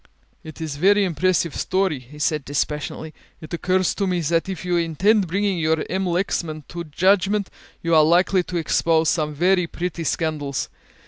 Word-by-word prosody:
"It 160 -1 -10
is 155 -3 -4
a - - -12
very 205 +4 +4
impressive 175 -2 0
story," 185 -6 0
he 125 +4 -15
said 150 0 0
dispassionately; 150 +2 -3 0.3
"it 155 - -11
occurs 185 +2 +1
to 200 - -1
me 180 -1 0
that 165 +4 0
if 190 -1 -5
you 180 -1 0
intend 180 +5 +2
bringing 195 +1 0
your 160 0 +1
M. 190 +1 -1
Lexman 170 -3 -2
to 170 0 -6
judgment 195 +5 +1 0.3
you 165 0 0
are 155 -1 +7
likely 180 +4 +3
to 180 - -4
expose 160 -1 +2
some 150 -2 -1
very 180 +2 +2
pretty 170 0 -4
scandals. 150 -4 -2
170 Hz, 175 wpm, -22 LUFS, 155-185 Hz, 0.3 s, are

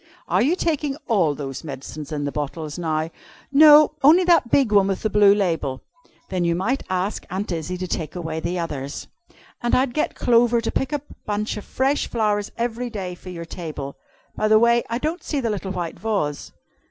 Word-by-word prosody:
Are - - +2
you 305 +8 +3
taking 300 -5 -1
all 175 - +2
those 135 -2 -6
medicines 145 +1 -7
in 145 -1 -2
the 145 - -2
bottles 150 +2 -4
now?" 160 -1 -1 0.4
"No 300 +1 +8
only 320 +7 +6
that 340 -9 +4
big 260 -4 +3
one 200 -2 +5
with 195 -1 -2
the 215 - 0
blue 205 -1 +6
label." 165 -9 -1 0.5
"Then 185 -2 -1
you 170 -1 +1
might 225 +10 0
ask 185 +2 -1
Aunt 190 +2 -3
Izzy 170 +2 -3
to 185 - -4
take 160 -1 -4
away 160 -2 -4
the 170 +2 -3
others. 145 -4 -4 0.6
And 240 - +2
I'd 255 -1 +1
get 305 - -1
Clover 235 0 +3
to 230 - -2
pick 265 - -1
a 295 -2 -2 0.2
bunch 210 +1 -1
of 210 - -7
fresh 270 +2 0
flowers 210 -3 0
every 240 +1 -2
day 190 -5 -5
for 180 +1 -11
your 170 -2 -6
table. 155 -5 -6 0.4
By 215 - 0
the 215 0 +6
way, 235 +1 +4
I 230 - -1
don't 310 +7 -3
see 290 - -2
the 235 -4 -1
little 195 -2 -4
white 175 -3 -4
vase." 195 -10 -2
200 Hz, 200 wpm, -22 LUFS, 165-240 Hz, 0.6 s, No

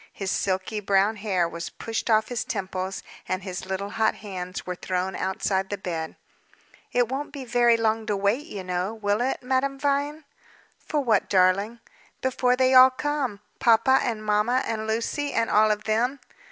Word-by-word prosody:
His 195 -1 -3
silky 190 +2 -1
brown 200 +2 +2
hair 190 -5 0
was 170 0 -6
pushed 225 +1 -4
off 220 -1 +3
his 245 -2 -2
temples, 190 -2 -4 0.3
and 185 0 -2
his 185 -1 -6
little 195 +1 -3
hot 220 0 +1
hands 185 -3 -6
were 180 - -3
thrown 185 +1 -3
outside 190 0 -1
the 205 - -3
bed. 165 -4 -4 0.8
"It 245 -1 +2
won't 270 +4 -4
be 275 -3 -7
very 240 -1 +4
long 225 -1 0
to 205 - 0
wait, 210 +10 0
you 200 - -6
know, 180 +4 -2
will 205 0 0
it, 260 +1 -1
Madame 265 +2 0
Vine?" 285 +2 -1 0.6
"For 300 - -2
what, 225 -6 +1
darling?" 195 +5 +2 0.4
"Before 250 -1 +1
they 260 0 +3
all 255 0 +9
come. 265 -6 -2 0.2
Papa 235 +3 +5
and 220 -3 -3
mamma, 210 +5 +2
and 220 -1 -3
Lucy, 235 +6 -1
and 230 - 0
all 215 +1 +5
of 210 0 0
them." 240 +6 0
220 Hz, 175 wpm, -25 LUFS, 190-250 Hz, 0.8 s, all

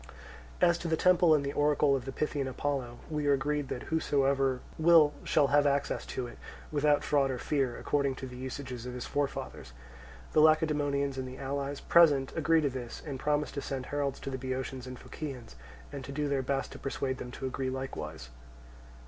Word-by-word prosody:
As 170 -1 +4
to 175 - -4
the 160 -1 +1
temple 175 -2 +5
and 140 -2 0
oracle 145 -1 +3
of 130 -2 -3
the 135 - -4
Pythian 145 -1 -2
Apollo, 130 -2 -3
we 150 -2 -2
are 140 - +5
agreed 145 +1 0
that 125 - -4
whosoever 135 -4 +2 0.2
will 160 -2 +6
shall 140 - +3
have 145 0 +4
access 140 0 0
to 130 - -3
it, 120 - -10 0.3
without 150 0 +3
fraud 140 -2 +2
or 130 - -2
fear, 135 -2 -1
according 140 -2 0
to 130 - -7
the 125 -1 -9
usages 125 -1 -6
of 125 - -6
his 125 - -5
forefathers. 140 - -3 0.6
The - - +5
Lacedaemonians 145 -3 +2
and 130 - -4
the 130 +1 -8
allies 140 +1 -3
present 145 -6 +4
agree 160 0 +3
to 145 - +1
this, 125 -2 -7
and 140 -4 -5
promise 150 +1 0
to 140 - -4
send 135 -2 -4
heralds 140 -1 -2
to 135 - -5
the 130 - -4
Boeotians 130 0 -4
and 130 0 -7
Phocians, 130 - -8 0.4
and 140 -2 -6
to 140 - -7
do 145 +1 -1
their 140 -1 +1
best 135 +1 -2
to - - -9
persuade 135 -1 -3
them 125 - -6
to 135 - -6
agree 130 0 -2
likewise. 80 - -5
2. - - -19
140 Hz, 200 wpm, -30 LUFS, 130-150 Hz, 0.6 s, will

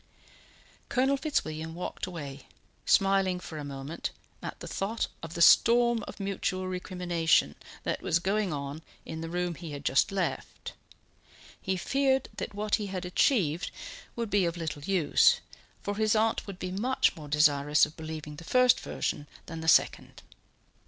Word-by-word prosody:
Colonel 265 +2 +2
Fitzwilliam 160 - -2
walked 180 +1 -4
away, 145 -6 -7 0.4
smiling 195 -2 +3
for 160 -3 -8
a - - -5
moment 140 +3 -5 0.3
at - - -6
the - - -8
thought 215 +4 -2 0.2
of 165 0 -8
the 170 - +4
storm 235 +1 +6
of - - -9
mutual 190 -1 -2
recrimination 180 - +1 0.3
that - - -2
was - - +2
going 195 +2 0
on 140 +1 -4 0.2
in 160 0 -6
the 165 - -5
room 175 0 -1
he 165 -2 -8
had 145 0 -7
just 135 - +3
left; 195 -2 -3 0.9
he 190 0 -1
feared 270 +5 +1
that - - -5
what 210 0 -3
he 210 - -4
had 185 -2 -4
achieved 180 - +2 0.5
would 230 -3 -3
be 200 -2 +3
of 170 0 -2
little 155 -3 -4
use, 175 -2 +4 0.4
for 205 - -2
his 215 0 +2
aunt 220 +1 +1
would 195 -2 -7
be 185 -1 -4
much 240 +8 +1
more 155 -2 -9
desirous 150 0 +4
of 150 - -12
believing 155 -2 -7
the 165 - -9
first 250 +6 +4
version 145 - -3 0.2
than 165 0 -7
the 160 - -5
second. - - +2
180 Hz, 160 wpm, -29 LUFS, 155-205 Hz, 0.9 s, storm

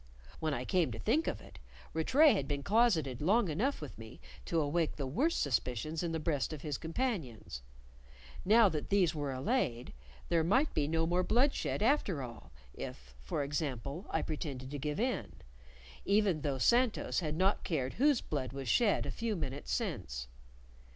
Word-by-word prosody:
When 160 -1 -1
I 125 -3 -2
came 180 +1 +1
to - - -5
think 310 +9 +1
of - - -2
it, - - -14 0.3
Rattray 270 - +5
had 140 - -1
been 140 -1 -2
closeted 190 - +2
long 200 +5 +3
enough 225 - 0
with 150 -6 -8
me 110 -1 -10 0.3
to 165 - 0
awake 155 +2 0
the 140 - -3
worst 270 - +1
suspicions 140 +3 -1
in 170 -2 -2
the 165 - -1
breasts 150 -2 -1
of 150 - -8
his 150 -3 -3
companions; 160 - -3 0.8
now 220 +3 +6
that 155 -5 -3
these 185 -5 +3
were 145 -3 -3
allayed, 130 - -1 0.4
there 165 -1 +3
might 260 - +2
be 145 -2 +1
no 165 +1 +1
more 175 +2 +2
bloodshed 240 +1 +1
after 210 - +2
all 120 - -10 0.2
(if, 65 +1 -8
for 65 - -2
example, 140 - -3
I 160 - 0
pretended 140 -4 -5
to 145 - -4
give 150 +5 -2
in), 250 +2 -1 0.7
even 200 -6 +2
though 140 -2 -1
Santos 240 - +2
had 155 -4 -2
not 190 +4 +2
cared 135 -7 -1
whose 285 0 +3
blood 135 -4 -3
was 135 -1 -5
shed 210 - +3
a - - -3
few 230 -2 -2
minutes 140 -5 -5
since. - - -3
160 Hz, 175 wpm, -33 LUFS, 140-210 Hz, 0.8 s, now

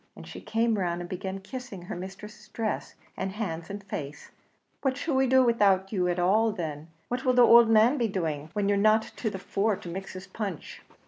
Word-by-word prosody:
and - - -11
she - - -9
came 225 -1 0
round 175 -2 -1
and 175 - -6
began 190 +1 -5
kissing 210 -2 -8
her 175 - -6
mistress's 210 +4 -9
dress, 220 -2 -3 0.2
and 190 0 -3
hands, 170 -6 -4
and 200 0 -6
face, 150 -7 -7 0.5
"What 265 -1 0
shall 310 +1 -2
we 265 0 +3
do 260 +1 +5
widout 200 -5 +3
you 185 -4 0
at 175 0 0
all 210 +6 +3
then? 160 -6 -5 0.2
what 250 +2 -3
will 255 - +3
the 245 -1 +7
ould 235 -1 +7
man 225 +6 +5
be 235 - +2
doing, 160 -7 -3
when 205 -1 0
you're 200 0 +2
not 215 +1 +4
to 220 - -1
the 195 - -6
fore 200 +2 0
to 180 - -9
mix 190 +3 -6
his 185 0 -8
punch?" 200 -7 -6
200 Hz, 215 wpm, -27 LUFS, 185-225 Hz, 0.5 s, the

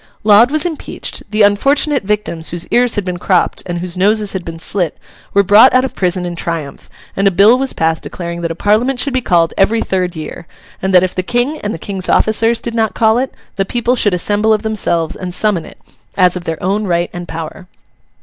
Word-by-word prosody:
Laud 215 +3 +6
was 310 +4 0
impeached; 330 -3 -5
the 215 0 +2
unfortunate 275 +8 +2
victims 195 -5 -2
whose 175 0 -3
ears 245 -1 +2
had 205 -3 -2
been 180 -1 -4
cropped 185 0 +1
and 175 -1 -3
whose 175 0 -4
noses 205 +2 +1
had 190 -2 -4
been 165 -1 -7
slit, 170 0 -2 0.3
were 200 - +3
brought 210 +6 +6
out 255 +1 +4
of 265 - -5
prison 180 -1 -1
in 175 -1 -5
triumph; 165 -4 -5 0.3
and 195 +1 +2
a - - +6
bill 200 +5 +5
was 270 0 0
passed 160 0 0
declaring 170 -1 -6
that 170 - -2
a 165 - -4
Parliament 225 +8 +1
should 280 - 0
be 260 - +1
called 170 -7 +2
every 215 +4 +3
third 185 -3 -2
year, 160 +2 -8 0.3
and 190 - -1
that 180 -1 +5
if 185 - -1
the 185 - -1
King 245 +10 -1
and 205 - -3
the - - -4
King's 190 +2 -4
officers 225 +2 +2
did 235 - -5
not 225 -1 0
call 220 +1 +3
it, 260 +1 -2 0.3
the 195 - +2
people 240 +4 0
should 205 -6 +2
assemble 205 +5 +1
of 215 0 -1
themselves 170 -7 -1
and 180 -1 -5
summon 200 -6 +1
it, - - -14 0.4
as 180 -2 +4
of 180 -1 -6
their 165 -1 -3
own 200 +3 0
right 175 -2 -1
and 175 0 -7
power. 165 +3 -7
195 Hz, 225 wpm, -15 LUFS, 175-220 Hz, 0.4 s, Laud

